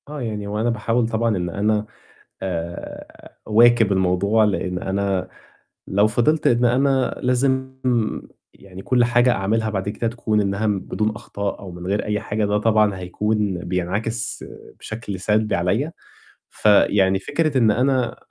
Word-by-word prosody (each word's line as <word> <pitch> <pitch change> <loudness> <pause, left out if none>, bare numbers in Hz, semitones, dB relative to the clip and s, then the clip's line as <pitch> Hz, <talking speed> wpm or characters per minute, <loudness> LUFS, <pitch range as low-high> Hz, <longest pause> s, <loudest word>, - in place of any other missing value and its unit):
آه، 150 -2 -6
يعني 105 -3 -4
هو 105 +1 -3
أنا 120 - +1
باحاول 115 +1 0
طبعًا 115 -2 0
إن 90 -1 -2
أنا 105 +3 0 0.6
آآ، 85 -2 -6
أواكب 115 -1 +5
الموضوع، 95 +3 +2
لإن 95 -3 -1
أنا 95 0 -1 0.6
لو 100 +2 +3
فضلت 120 +8 +1
إن 120 0 +3
أنا 130 +1 +1
لازم 130 +1 0 0.8
يعني 95 -1 -12
كُلّ 125 +3 +2
حاجة 120 +1 +3
أعملها 110 +1 0
بعد 100 -1 -2
كده 115 +2 -2
تكون 110 -2 0
إنها 100 +2 -1
بدون 105 +1 -1
أخطاء، 100 -3 -5
أو 95 -2 -9
من 90 +1 -8
غير 100 +2 -1
أي 105 0 -1
حاجة 105 0 -2
ده 105 0 +1
طبعًا 105 -2 +2
هيكون 100 +1 -1
بينعكس 95 +6 -3 0.4
بشكل 110 -4 -6
سلبي 105 +3 +1
عليَّ، 100 - 0 0.6
فيعني 100 -2 +3
فكرة 145 +6 0
إن 115 -3 +4
أنا 125 +1 +1
105 Hz, 145 wpm, -21 LUFS, 95-120 Hz, 0.8 s, أواكب